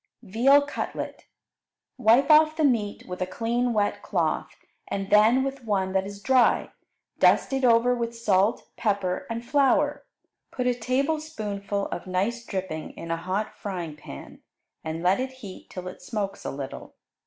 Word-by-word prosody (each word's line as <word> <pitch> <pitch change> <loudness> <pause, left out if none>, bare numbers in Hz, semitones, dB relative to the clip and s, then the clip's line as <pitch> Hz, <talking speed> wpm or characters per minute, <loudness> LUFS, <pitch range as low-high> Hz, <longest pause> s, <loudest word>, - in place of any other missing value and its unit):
Veal 250 +8 +4
Cutlet 290 - -5 0.7
Wipe 250 +7 +5
off 310 0 +6
the 315 - +1
meat 230 -7 +1
with 180 0 -6
a 185 - 0
clean 235 +5 -1
wet 210 -2 0
cloth, - - -1 0.3
and 195 0 -4
then 220 +5 +5
with 270 -1 -4
one 195 -4 0
that 190 0 0
is 200 0 -10
dry. 260 -1 +3 0.5
Dust - - +4
it 270 0 0
over 240 0 +5
with 235 -1 -3
salt, 210 -1 +1
pepper, 200 +4 -1
and 230 +1 -4
flour. 290 +1 +2 0.5
Put 250 - -3
a 250 - +3
tablespoonful 240 -6 -2
of 175 - -6
nice 200 +6 -1
dripping 185 -7 -5
in 165 - -6
a - - +1
hot 185 +5 -3
frying 175 -6 -5
pan, 70 - -11 0.4
and 160 +1 -4
let 185 +4 +3
it 260 0 -3
heat 210 -8 -11
till 185 -1 -7
it 185 - -9
smokes 200 -4 -4
a - - -1
little. 135 -1 -7
220 Hz, 160 wpm, -26 LUFS, 190-255 Hz, 0.7 s, off